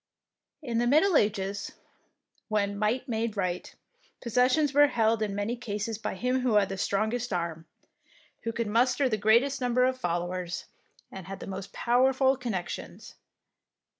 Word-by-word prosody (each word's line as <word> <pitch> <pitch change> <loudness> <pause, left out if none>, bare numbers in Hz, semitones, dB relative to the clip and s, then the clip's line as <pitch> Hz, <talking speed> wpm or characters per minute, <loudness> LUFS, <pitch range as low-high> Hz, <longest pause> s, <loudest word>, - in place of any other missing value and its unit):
In 235 -4 -1
the 240 - +1
Middle 315 +8 +4
Ages, 200 -3 0 0.7
when 205 -2 0
might 220 +6 0
made 225 -2 -2
right, 180 -2 -2 0.5
possessions 255 +5 +2
were 290 +1 +6
held 225 -3 +1
in 205 -2 -1
many 205 +4 -2
cases 220 -2 -4
by 210 - -4
him 250 +6 0
who 250 -4 +1
had 200 -2 +4
the 195 - -4
strong 215 +4 0
est 245 -1 -3
arm, 165 -1 -5 0.7
who 230 - -3
could 230 0 -2
muster 250 +5 +2
the 230 - +1
greatest 235 +7 +3
number 250 0 +2
of 260 0 +1
followers 175 -1 -3 0.5
and 190 -2 -9
had 195 0 -7
the - - -7
most 195 -1 -6
powerful 260 +2 +3
connections. 225 -9 -5
225 Hz, 155 wpm, -28 LUFS, 200-250 Hz, 0.7 s, were